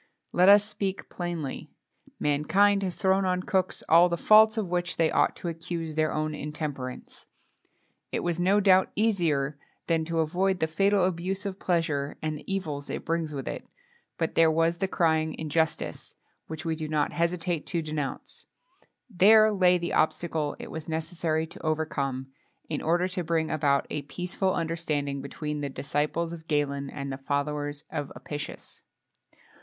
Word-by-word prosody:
Let 180 +2 +5
us 205 0 +7
speak 200 -2 -3
plainly: 170 -6 -4 0.5
mankind 190 +8 +3
has 185 -3 -2
thrown 190 0 +2
on 180 -1 0
cooks 185 -2 -1
all 170 +2 +6
the 170 - -1
faults 220 +3 +6
of 215 -4 -1
which 175 -1 -1
they 165 -1 +3
ought - - +2
to - - -6
accuse 165 -1 -4
their 155 0 +1
own 155 0 -1
intemperance. 145 -4 -6 0.8
It - - -1
was 175 -1 -1
no 190 +3 +4
doubt 190 -2 +5
easier, 160 -10 +1 0.3
than 165 -1 +1
to 165 0 -3
avoid 185 +4 0
the 160 - +2
fatal 195 +4 +2
abuse 185 +2 -2
of 195 -1 -4
pleasure, 155 -5 -1
and 155 -1 -2
the 150 - -8
evils 150 -7 -3
it - - -4
brings 165 -2 -1
with 135 -3 -5
it; - - -5 0.5
but 165 - -1
there 165 -1 +5
was 165 +1 +2
the 195 - +1
crying 160 -3 +1
injustice, 160 +1 -2 0.3
which 160 +2 -7
we 165 -1 0
do 155 -1 -4
not 150 -1 0
hesitate 170 -1 -1
to 170 -3 -1
denounce; 150 -3 -5 0.6
there 215 +1 +6
lay 180 -3 +4
the 170 0 -3
obstacle 155 -1 0
it - - -9
was 160 0 -6
necessary 160 0 -1
to 160 - -12
overcome, 145 -4 -1 0.4
in 150 - -3
order 175 +3 +2
to 185 -1 -2
bring 160 -1 0
about 140 -2 +2
a 150 - -2
peaceful 180 +6 -2
understanding 155 -4 -2
between 150 +2 -5
the 140 - -2
disciples 150 +5 -1
of 165 -1 -10
Galen 140 -2 -1
and 140 -1 -5
the 135 - -6
followers 145 +1 -2
of 145 -3 -4
Apicius. 150 0 -7
165 Hz, 165 wpm, -27 LUFS, 150-180 Hz, 0.8 s, us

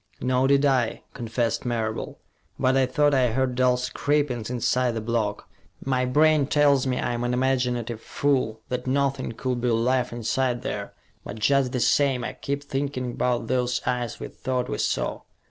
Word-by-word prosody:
"Nor 130 +1 +2
did 140 +1 +4
I," 130 -5 +1
confessed 115 -1 -2
Marable. 115 -3 -3 0.4
"But 130 +1 +2
I 135 -1 +3
thought 145 +3 +2
I 130 -2 +4
heard 130 0 +1
dull 125 0 +3
scrapings 125 -2 -1
inside 125 0 +1
the 115 - -2
block. 110 -2 -2 0.4
My 130 -1 +1
brain 150 +2 +3
tells 140 -3 +3
me 125 -1 0
I'm 120 0 -1
an 120 0 0
imaginative 125 -3 0
fool, 130 -6 0
that 125 0 -3
nothing 135 -2 0
could 125 +1 -2
be 125 - 0
alive 125 +2 +1
inside 120 +1 -1
there, - - -4 0.3
but 105 - -7
just 135 +3 +2
the 125 - -1
same, 135 0 +2
I - - -4
keep 140 +1 -4
thinking 135 -3 -3
about 125 0 0
those 125 -1 0
eyes 120 -2 -2
we - - -6
thought 125 -1 -3
we - - -3
saw. - - -1
125 Hz, 170 wpm, -25 LUFS, 120-135 Hz, 0.4 s, did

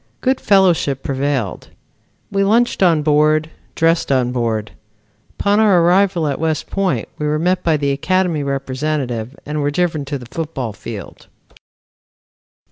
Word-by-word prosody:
Good 260 0 +1
fellowship 175 -9 +2
prevailed. 135 - -2 0.6
We 195 0 +1
lunched 230 +4 +2
on 165 -5 +4
board, 155 +1 +2 0.2
dressed 165 -2 +1
on 125 -2 +2
board. 115 -4 -2 0.7
Upon 205 +1 +2
our 205 -5 +5
arrival 180 -1 +3
at 145 - -2
West 160 -1 -2
Point 195 -2 -1
we 150 - -1
were 150 +1 +1
met 180 +4 0
by 160 -2 +2
the 140 -1 0
Academy 180 +2 0
representative 135 -3 -3
and 150 +1 -3
were 145 - +1
driven 160 -1 -1
to 140 +1 -3
the 125 - -11
football 135 -4 -4
field. - - -9
155 Hz, 140 wpm, -18 LUFS, 135-180 Hz, 0.7 s, our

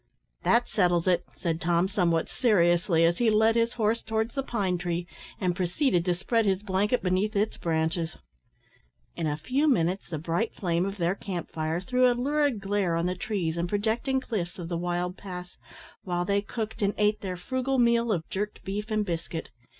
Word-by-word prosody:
"That 240 +1 +3
settles 175 -4 +2
it," 180 -1 +2
said 165 -2 -2
Tom, 170 +1 +2
somewhat 175 -5 +1
seriously, 175 -7 +3
as 170 +1 +2
he 235 -2 +4
led 220 +1 +4
his 230 0 +2
horse 225 0 +1
towards 220 +1 -1
the 275 - -1
pine 200 -9 -1
tree, 175 -1 -2 0.3
and 180 -2 0
proceeded 180 - +1
to 180 -1 +2
spread 225 +4 +1
his 195 +1 +1
blanket 205 +4 +1
beneath 190 +4 +1
its 210 +2 0
branches. 160 0 -1 1.0
In 165 -2 -1
a 150 0 -1
few 265 - 0
minutes 185 - +1
the 160 - -3
bright 170 +8 -1
flame 175 0 0
of 195 +1 -5
their 175 0 +1
camp 185 -4 -5
fire 160 +1 -1
threw 250 +6 +3
a 240 - -1
lurid 285 -2 +1
glare 195 -3 0
on 170 +1 0
the 180 - 0
trees 180 -3 -2
and 170 +1 -1
projecting 225 +6 0
cliffs 190 -9 -4
of 170 -2 -6
the 175 - -2
wild 175 +1 -2
pass, 180 -2 -8 0.5
while 175 -1 -2
they 200 +2 +2
cooked 220 +1 -5
and 200 0 +1
ate 210 0 +2
their 185 -2 -4
frugal 260 +7 -1
meal 235 -1 +3
of 165 -5 -1
jerked 210 +2 -4
beef 205 +3 -4
and 215 -1 0
biscuit. 165 -2 -4
190 Hz, 190 wpm, -27 LUFS, 175-220 Hz, 1.0 s, he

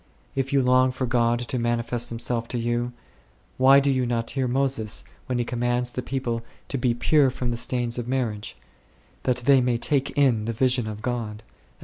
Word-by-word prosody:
If 135 0 -2
you 140 -2 +3
long 130 +1 +4
for 130 +1 -2
God 120 -1 +2
to 120 +1 -2
manifest 120 0 -1
Himself 115 0 -2
to 125 - -3
you, 120 +1 -1 0.7
why 135 +2 +7
do 140 0 +2
you 130 -2 +1
not 115 -1 0
hear 130 -2 -1
Moses, 125 -4 -1 0.2
when 125 - -1
he 120 - 0
commands 120 +1 -1
the 125 - -3
people 125 -3 -2 0.3
to 135 - -2
be 120 -1 +1
pure 140 +3 +3
from 125 -1 -3
the - - -1
stains 120 0 -2
of 120 - -5
marriage, 115 -5 -2 0.7
that 125 - +2
they 135 -1 +6
may 125 -1 +1
take 140 +2 +1
in 125 -7 +3
the 115 - -2
vision 125 0 +2
of 110 0 -6
God 115 -3 -3
4? - - -32
120 Hz, 200 wpm, -25 LUFS, 115-130 Hz, 0.7 s, why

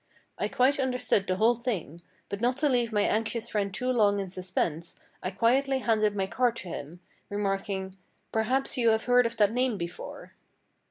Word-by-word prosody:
I - - +1
quite 270 +3 +2
understood 250 -6 +1
the 185 - +1
whole 225 +5 +4
thing; 215 - -4 0.3
but 200 +1 -5
not 250 +2 +1
to 295 - +2
leave 240 -3 +1
my 210 -1 +2
anxious 225 +2 0
friend 200 -2 -1
too 250 +6 -1
long 205 -4 +3
in 195 -2 -4
suspense 175 -3 -2 0.2
I 185 - -2
quietly 260 +7 +2
handed 215 -4 +1
my 195 -1 0
card 240 +4 +1
to 190 -6 -7
him, 165 +3 -7 0.3
remarking, 195 -1 -2 0.3
"Perhaps 255 +5 0
you 235 -1 +4
have 220 0 +1
heard 245 -1 +5
of 230 - -8
that 205 -1 +4
name 250 -3 +1
before." 170 0 -7
220 Hz, 180 wpm, -28 LUFS, 195-245 Hz, 0.3 s, heard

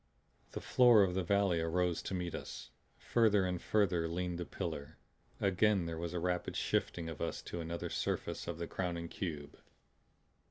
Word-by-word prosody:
The - - -4
floor 120 -4 +6
of 90 -2 +1
the 95 - +1
valley 95 -1 +2
arose 85 +1 +1
to 95 - -4
meet 90 -2 -3
us. - - -7 0.3
Further 105 -5 +3
and 90 -1 -2
further 90 -6 +2
leaned 90 +1 -2
the 90 - -4
pillar. 70 +2 -5 0.4
Again 100 -1 +3
there 80 -1 -4
was 85 +1 -4
a - - 0
rapid 90 0 -1
shifting 85 -2 0
of 80 -3 -6
us - - -2
to 85 - -5
another 85 +1 -4
surface - - -2
of 85 - -3
the 85 - -3
crowning 85 -2 -3
cube. 75 -6 -5
90 Hz, 170 wpm, -34 LUFS, 85-95 Hz, 0.4 s, floor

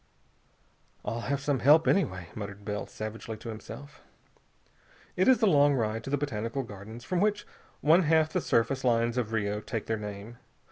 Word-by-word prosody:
"I'll 115 +3 -2
have 140 +3 -2
some 140 -2 0
help, 150 +6 +6
anyway," 90 - +1
muttered 100 -1 -7
Bell 105 0 -3
savagely 110 +1 -6
to 115 - -8
himself. 130 +6 -9 1.1
It 185 - +2
is 260 -3 +5
a - - +7
long 145 -6 +5
ride 115 -2 -1
to - - -5
the 145 - +1
Botanical 130 -2 -3
Gardens, 110 +1 -10
from 180 +4 -1
which 210 0 +1 0.4
one 160 +5 +5
half 160 -1 +3
the - - +1
surface 125 +4 +1
lines 115 -1 +2
of 120 -3 -1
Rio 105 -2 -1
take 115 -1 -4
their 110 -1 -2
name. 105 +2 -7
115 Hz, 175 wpm, -29 LUFS, 110-145 Hz, 1.1 s, a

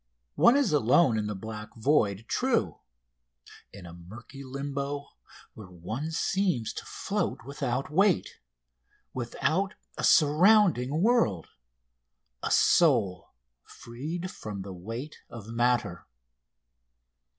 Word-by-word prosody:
One 245 - +5
is 280 - +1
alone 135 0 +4
in 105 - -2
the 105 - -4
black 105 +1 -8
void 110 -4 +1
true, 255 -2 0 0.9
in 95 -3 -12
a 85 - -10
murky 115 +10 -12
limbo, 140 +1 -5 0.4
where 105 -4 -12
one 110 - -5
seems 170 - -1
to - - -7
float - - -3
without 135 -1 -3
weight, 190 +2 +1 0.7
without 160 - -1 0.2
a - - -3
surrounding 160 - +4
world 215 - +2 0.9
a - - -2
soul 110 - +2 0.3
freed 160 +10 -7
from 100 -3 -7
the 95 -1 -8
weight 115 - -7
of 115 -2 -10
matter. 115 -6 0
130 Hz, 105 wpm, -28 LUFS, 105-160 Hz, 0.9 s, One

